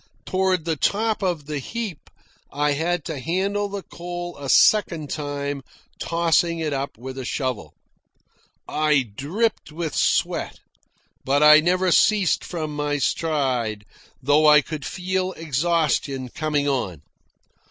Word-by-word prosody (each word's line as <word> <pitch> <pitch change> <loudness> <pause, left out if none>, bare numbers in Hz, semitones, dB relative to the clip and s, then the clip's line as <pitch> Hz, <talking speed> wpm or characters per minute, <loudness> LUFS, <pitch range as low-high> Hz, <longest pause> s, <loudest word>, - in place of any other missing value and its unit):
Toward 185 -3 0
the 165 -1 0
top 215 +7 0
of 175 -6 -1
the 150 -1 -3
heap 205 - -6 0.4
I 145 0 +1
had 160 +2 -1
to 155 -4 -4
handle 195 +7 -1
the 200 -1 -5
coal 175 0 -7
a 140 -1 -7
second 170 -7 +4
time, 145 -2 -3 0.4
tossing 170 0 +1
it 155 -3 -2
up 140 -2 -4
with 130 +3 -7
a - - -4
shovel. 130 -3 -3 0.9
I 150 -3 +2
dripped 155 - -2
with 160 -1 -4
sweat, - - 0 0.7
but 140 +2 +2
I 150 0 +9
never 180 +3 +1
ceased 200 -1 +3
from 155 -4 -5
my 145 0 -1
stride, 130 -8 -1 0.3
though 145 +3 +3
I 150 0 +7
could 150 0 -6
feel 185 0 -2
exhaustion 150 -4 0
coming 150 +1 -1
on. 95 - -2
155 Hz, 130 wpm, -23 LUFS, 140-175 Hz, 0.9 s, I